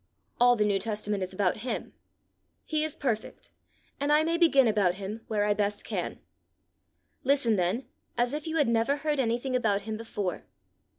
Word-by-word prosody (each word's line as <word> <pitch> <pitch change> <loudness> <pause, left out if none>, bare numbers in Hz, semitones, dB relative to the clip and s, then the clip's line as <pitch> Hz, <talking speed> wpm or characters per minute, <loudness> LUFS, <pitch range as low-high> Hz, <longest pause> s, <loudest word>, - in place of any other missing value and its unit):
All 245 0 +6
the 210 -2 +2
New 200 -1 +2
Testament 210 -2 -2
is 185 - -3
about 190 -1 +1
him. 240 +3 -4 0.7
He 310 -1 0
is 310 -1 -3
perfect, 230 -6 -3 0.5
and 285 +1 0
I 300 +1 +5
may 330 +1 +1
begin 315 -7 +5
about 200 -5 +2
him 205 +3 -6
where 210 -2 +1
I 210 - +3
best 205 0 -1
can. - - -3 1.1
Listen 265 -5 +3
then 190 +7 0 0.3
as 240 +2 +1
if 300 +2 -4
you 320 - -2
had 295 - +3
never 230 +4 +2
heard 295 0 -1
anything 245 +1 0
about 205 -5 +1
him 220 +1 -4
before. 205 -5 -4
230 Hz, 175 wpm, -28 LUFS, 205-280 Hz, 1.1 s, All